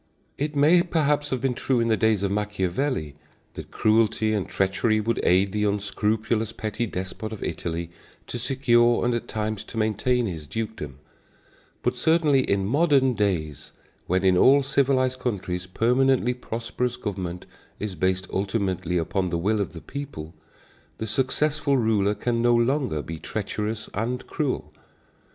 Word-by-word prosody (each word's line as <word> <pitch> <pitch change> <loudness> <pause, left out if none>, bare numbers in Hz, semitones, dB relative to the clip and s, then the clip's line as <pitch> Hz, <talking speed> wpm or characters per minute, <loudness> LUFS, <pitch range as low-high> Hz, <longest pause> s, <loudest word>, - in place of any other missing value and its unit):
It 150 +1 -3
may 155 +5 +5
perhaps 150 -4 +1
have 130 -2 -2
been 135 -1 +1
true 125 +1 0
in 115 - +1
the 110 - +3
days 110 -3 +2
of 100 - 0
Machiavelli 105 - -1 0.4
that - - -8
cruelty 110 0 +2
and 100 -3 -2
treachery 105 +3 +1
would 115 +2 -1
aid 95 +2 +3
the 105 +1 0
unscrupulous 105 +2 0
petty 110 +2 -3
despot 95 +3 -5
of 110 - -6
Italy 85 0 -4 0.3
to 120 - -5
secure 120 -2 +3
and 120 - +2
at 120 - -3
times 110 -1 -3
to 115 - -9
maintain 115 +3 +1
his 80 -7 -5
dukedom; 80 - -5 0.9
but - - +1
certainly 160 -4 +3
in 100 -5 0
modern 140 - +3
days, 90 - -2 0.3
when 95 +2 +1
in 95 -1 +5
all 140 +2 +6
civilized 130 -1 +1
countries 90 -7 -3
permanently 125 +5 +2
prosperous 120 0 -3
government 90 -4 -5 0.3
is 105 -2 -4
based 95 +2 0
ultimately 95 -3 -1
upon 90 +3 -1
the 85 - -1
will 105 +5 +1
of 100 - -3
the 85 - -8
people, 135 - -7 0.6
the 110 - -4
successful 140 +5 +1
ruler 105 -3 +2
can 115 +3 -1
no 120 0 +4
longer 120 - +1
be 80 -1 -7
treacherous 110 +2 -3
and 120 +4 -2
cruel. 130 - -3
110 Hz, 150 wpm, -25 LUFS, 95-125 Hz, 0.9 s, all